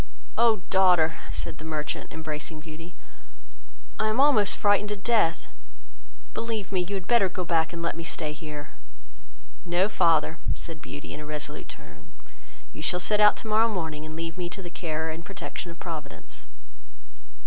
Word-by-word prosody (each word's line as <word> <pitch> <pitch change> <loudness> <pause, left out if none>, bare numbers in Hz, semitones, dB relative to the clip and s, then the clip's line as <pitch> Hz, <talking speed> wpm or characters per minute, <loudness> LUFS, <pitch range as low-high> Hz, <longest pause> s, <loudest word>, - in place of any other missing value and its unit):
"Oh, 225 -5 +4
daughter, 180 -4 +5
(said - - -4
the - - -8
merchant, 155 -1 -3
embracing 155 0 -4
Beauty,) 165 +2 -10 1.0
I 215 - +2
am 215 +3 +1
almost 255 -8 +5
frightened 205 0 +3
to 210 - -1
death; 200 -5 +2 0.9
believe 225 -4 -3
me, 185 -2 +2
you 200 +3 -3
had 190 -2 -4
better 230 -3 +4
go 180 0 -3
back, 165 -1 +2
and 170 -1 -5
let 170 - 0
me 170 - -5
stay 155 -2 -3
here." 150 -1 -7 0.9
"No, 180 +2 +3
father, 165 -5 +3 0.2
(said 160 -3 -8
Beauty, 145 0 -7
in - - -6
a 150 - -7
resolute 150 0 -5
tone,) 80 +2 -13 0.6
you - - -8
shall 180 +3 +1
set 210 +3 +2
out 210 0 +7
tomorrow 220 +1 +3
morning, 160 -7 -3
and 155 0 -7
leave 165 +1 -4
me 175 -1 -2
to 195 +2 -6
the 175 - -7
care 160 -1 -2
and 165 +2 -6
protection 190 -1 -6
of 170 - -9
Providence." 150 - -7
170 Hz, 170 wpm, -27 LUFS, 155-200 Hz, 1.0 s, out